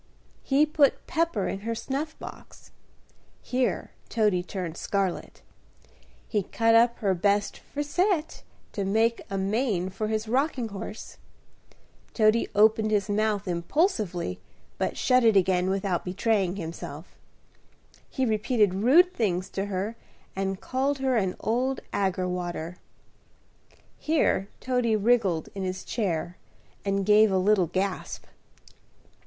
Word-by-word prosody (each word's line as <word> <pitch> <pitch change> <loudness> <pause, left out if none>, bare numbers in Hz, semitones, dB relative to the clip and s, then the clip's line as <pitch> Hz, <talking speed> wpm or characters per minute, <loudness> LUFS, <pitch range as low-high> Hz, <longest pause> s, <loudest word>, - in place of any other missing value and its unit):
He 285 +2 +3
put 300 -2 +2
pepper 330 - 0
in 195 - -3
her 230 +3 -3
snuff 285 +6 -4
box," - - -12 0.7
here 255 0 -1 0.2
Toady 210 -5 +2
turned 180 -2 -5
scarlett, 195 -2 -3 0.8
"he 210 - 0
cut 225 +4 +1
up 235 +1 +5
her 195 -3 +2
bestt 200 +3 +1
frisette 320 +3 -1 0.3
to 200 - -3
make 225 +4 +1
a 195 - -2
mane 195 -2 0
for 215 +3 -3
his 220 0 -2
rocking 255 -1 0
horse," 200 +2 -8 1.0
Toady 220 0 +3
opened 215 +1 +4
his 205 -2 +1
mouth 205 -1 0
impulsively, 180 - -1 0.4
but - - -1
shut 255 -1 +3
it 220 -3 +5
again 185 -1 +2
without 190 -2 -1
betraying 190 0 0
himself 165 -3 -7 0.9
"he 265 - -1
repeated 215 -2 +2
rude 285 - +5
things 185 - -1
to 195 - -3
her, 200 +3 -3 0.4
and 195 0 -2
called 270 +2 -1
her 265 -1 0
'an 190 -5 0
old 250 +4 0
aggrewater,'" 180 -3 -2 1.2
here 295 -10 +1
Toady 250 -3 +1
wriggled 205 -7 +2
in 195 - -5
his 185 0 -4
chair, 175 -5 -2 0.5
and 195 -1 0
gave 210 0 +5
a 190 - +2
little 190 -1 +3
gasp. 185 +3 -3
210 Hz, 125 wpm, -27 LUFS, 190-240 Hz, 1.2 s, up